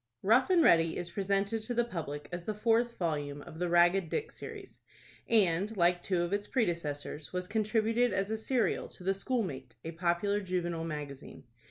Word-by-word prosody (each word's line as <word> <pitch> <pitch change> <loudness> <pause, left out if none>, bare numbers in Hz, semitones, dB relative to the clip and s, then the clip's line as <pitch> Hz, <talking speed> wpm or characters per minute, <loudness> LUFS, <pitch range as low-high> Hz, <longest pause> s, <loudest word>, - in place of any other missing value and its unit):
"ROUGH 230 +6 +5
AND 355 -3 +5
READY" 165 - +4
is 175 -1 -5
presented 200 +3 0
to 240 +3 -4
the 240 - +3
public 160 -9 -5
as 175 -1 -5
the 215 - -2
fourth 230 +2 +1
volume 145 -4 -2
of 160 - -11
the 180 -1 0
"Ragged 175 +1 +4
Dick 440 - -2
Series," 415 -4 -10 0.5
and, 200 -1 +2
like 175 0 +3
two 180 -2 0
of 175 +3 -2
its 205 0 -1
predecessors, 155 - -2
was 180 0 -3
contributed 220 +3 +1
as 195 +2 -1
a - - +1
serial 235 +1 0
to - - -13
the 195 +1 +2
"Schoolmate," 195 - -3
a 165 - -3
popular 175 +5 0
juvenile 175 -3 -2
magazine. 150 -3 -7
185 Hz, 180 wpm, -31 LUFS, 170-220 Hz, 0.5 s, ROUGH